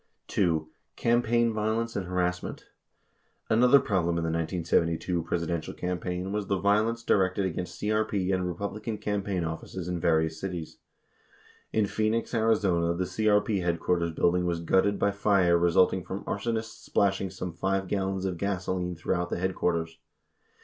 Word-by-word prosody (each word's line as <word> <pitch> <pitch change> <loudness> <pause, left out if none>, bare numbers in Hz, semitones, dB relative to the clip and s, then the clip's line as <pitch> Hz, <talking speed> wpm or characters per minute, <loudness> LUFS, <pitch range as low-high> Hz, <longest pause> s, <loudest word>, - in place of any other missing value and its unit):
27 85 -5 +2
2. 80 - -27 0.2
CAMPAIGN 120 0 +2
VIOLENCE 110 +2 -1
AND 95 -3 -2
HARASSMENT 90 0 -2 0.9
Another 125 +5 +6
problem 85 -7 0
in 85 - -1
the 80 - -1
1972 85 +1 0
Presidential 85 -1 -3
campaign 90 +1 -3
was 105 -1 -2
the 100 - +1
vio 100 +3 +3
lence 115 0 -3
directed 95 -2 +2
against 90 0 -4
CRP 105 -3 0
and 90 -1 0
Republican 100 +5 -4
campaign 100 -3 -2
offices 80 +2 -5
in 90 -1 -2
various 80 -1 +1
cities. 90 -4 -5 0.9
In 110 -1 +2
Phoenix, 110 +3 -1
Ariz., 110 -1 +3
the 85 -1 +1
CRP 105 +2 +1
headquarters 85 0 0
building 90 +2 +1
was 85 -1 -1
gutted 95 +4 +2
by 100 - +2
fire 100 -3 +3
resulting 90 +2 +3
from 95 +3 -6
arsonists 115 +2 -3
splashing 95 -1 +1
some 90 -2 -6
5 95 +2 -1
gallons 95 -1 -1
of 90 -3 -3
gasoline 90 -2 -2
throughout 90 +1 -1
the - - -2
headquarters. 85 -3 -1
95 Hz, 145 wpm, -28 LUFS, 85-105 Hz, 0.9 s, Another